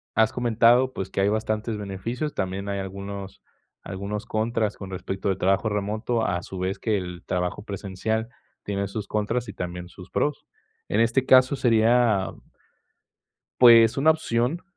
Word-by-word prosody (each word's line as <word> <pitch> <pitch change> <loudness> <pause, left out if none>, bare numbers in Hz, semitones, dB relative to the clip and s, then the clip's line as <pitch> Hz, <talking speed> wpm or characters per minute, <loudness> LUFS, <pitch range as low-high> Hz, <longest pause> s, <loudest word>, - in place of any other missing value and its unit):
has 110 0 +3
comentado, 120 +2 +3
pues, 95 - -4
que 95 - -1
hay 100 - +3
bastantes 110 +1 -1
beneficios, 105 +9 -4
también 95 +1 -3
hay 100 - -2
algunos 100 0 -7 0.5
algunos 100 +3 -5
contras 110 -1 -1
con 95 -1 -8
respecto 95 +1 -3
del 95 - 0
trabajo 95 +4 +1
remoto, 110 +3 -1
a 90 0 -1
su 95 - -8
vez 95 +1 -2
que 110 -2 0
el 90 -2 -6
trabajo 90 +2 -2
presencial 105 +3 -3 0.3
tiene 100 -1 -2
sus 100 +1 -5
contras 110 +3 -1
y - - -6
también 90 -1 -6
sus 90 +1 -13
pros. 150 -1 -1 0.4
En 105 - +1
este 120 +3 +2
caso 130 +1 +6
sería 115 -4 +3 1.3
pues, 115 -2 +8
una 145 +3 +4
opción 140 +1 0
105 Hz, 155 wpm, -25 LUFS, 95-115 Hz, 1.3 s, pues